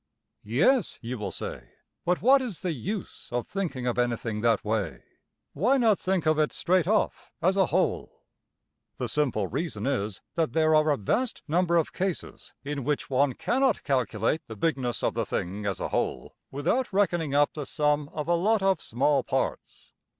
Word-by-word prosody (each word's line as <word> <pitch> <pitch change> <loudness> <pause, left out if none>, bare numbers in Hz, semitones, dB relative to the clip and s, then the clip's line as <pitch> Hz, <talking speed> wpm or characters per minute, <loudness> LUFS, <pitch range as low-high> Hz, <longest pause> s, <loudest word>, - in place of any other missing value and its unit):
Yes, 175 - +2
you 120 +1 -4
will 100 -2 -3
say, - - -7 0.3
but 180 +1 +1
what 270 +3 +6
is 230 -10 -5
the 180 - -1
use 185 - -5
of 120 0 -1
thinking 160 -11 -3
of 125 0 0
anything 115 -3 -1
that 115 -2 +2
way? 100 - -2 0.5
Why 240 - +3
not 225 -6 +3
think 185 -3 0
of 155 0 +3
it 150 - +2
straight 180 -1 +1
off, 215 +1 0
as 185 +3 +2
a 190 -3 +3
whole? - - -1 0.7
The - - -2
simple 130 -9 0
reason 160 - -3
is 110 -8 -1
that 165 -2 0
there 155 -1 +3
are 155 0 +4
a 145 - +2
vast 235 - -1
number 170 +2 +2
of 165 - 0
cases 190 -2 -4
in 140 -1 -3
which 145 +1 -2
one 135 +1 +3
cannot 260 - +1
calculate 125 +1 0
the 110 - -7
bigness 125 -1 -1
of - - +1
the - - 0
thing 100 +4 -3
as 100 - -2
a - - -3
whole - - -2
without 175 - 0
reckoning 175 -7 +1
up 145 0 +3
the 150 -3 -5
sum 150 -1 +1
of 150 0 -4
a 175 - +3
lot 200 +4 +2
of 195 -4 +2
small 135 +4 +1
parts. - - -3
150 Hz, 180 wpm, -27 LUFS, 125-185 Hz, 0.7 s, what